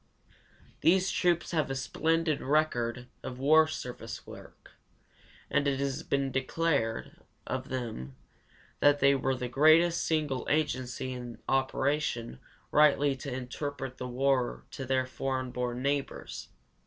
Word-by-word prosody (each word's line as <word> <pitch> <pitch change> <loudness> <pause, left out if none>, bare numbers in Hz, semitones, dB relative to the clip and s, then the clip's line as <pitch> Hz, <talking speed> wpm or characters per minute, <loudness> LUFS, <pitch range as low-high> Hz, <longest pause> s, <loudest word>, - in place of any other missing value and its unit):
These 185 +2 +3
troops 175 -2 +1
have 155 -5 0
a 135 - -2
splendid 160 +3 0
record 125 -5 0
of 125 - -6
war 155 +4 +5
service 125 -6 -6
work, - - -13 0.8
and 140 0 +1
it 135 -1 +1
has 140 -1 -1
been 140 -1 -1
declared 135 -3 -1 0.3
of 130 0 -4
them 115 - -5 0.6
that 145 0 +5
they 140 0 +5
were 135 -1 0
the 125 -1 -3
greatest 155 +6 +5
single 150 -5 -1
agency 130 -4 -1
in 120 -2 -7
operation 135 - 0 0.3
rightly 145 -2 +4
to 135 +1 -6
interpret 130 +1 -5
the 125 - -4
war 130 0 0
to 135 - -6
their 130 0 +1
foreign 130 0 -3
born 125 0 -3
neighbors. 140 0 -3
135 Hz, 130 wpm, -30 LUFS, 125-150 Hz, 0.8 s, war